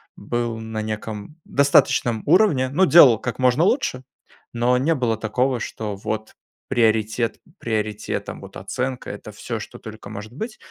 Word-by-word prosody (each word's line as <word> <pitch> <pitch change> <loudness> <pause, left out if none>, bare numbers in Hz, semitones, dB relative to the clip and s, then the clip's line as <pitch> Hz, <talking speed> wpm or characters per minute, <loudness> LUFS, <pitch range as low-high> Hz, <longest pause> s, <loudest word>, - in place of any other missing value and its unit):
был 120 -1 -3
на 110 -1 -4
неком 110 +4 -6
достаточном 125 -5 +3
уровне, 155 -7 +4
ну 175 +8 +3
делал 145 -10 +8
как 125 +2 -5
можно 130 +4 +3
лучше, 175 - +1 0.5
но 120 +1 +2
не 145 +6 +2
было 120 -5 0
такого, 125 +4 0
что 110 -2 -5
вот 110 +2 -5 0.3
приоритет 115 -1 +1 0.2
приоритетом, 110 -2 -3
вот - - -12
оценка- 130 0 -4
это 100 +1 -8
всё, 115 +3 -5
что 105 - -9
только 110 -2 -10
может 105 +1 -8
быть, 215 - -6
120 Hz, 145 wpm, -22 LUFS, 110-130 Hz, 0.5 s, делал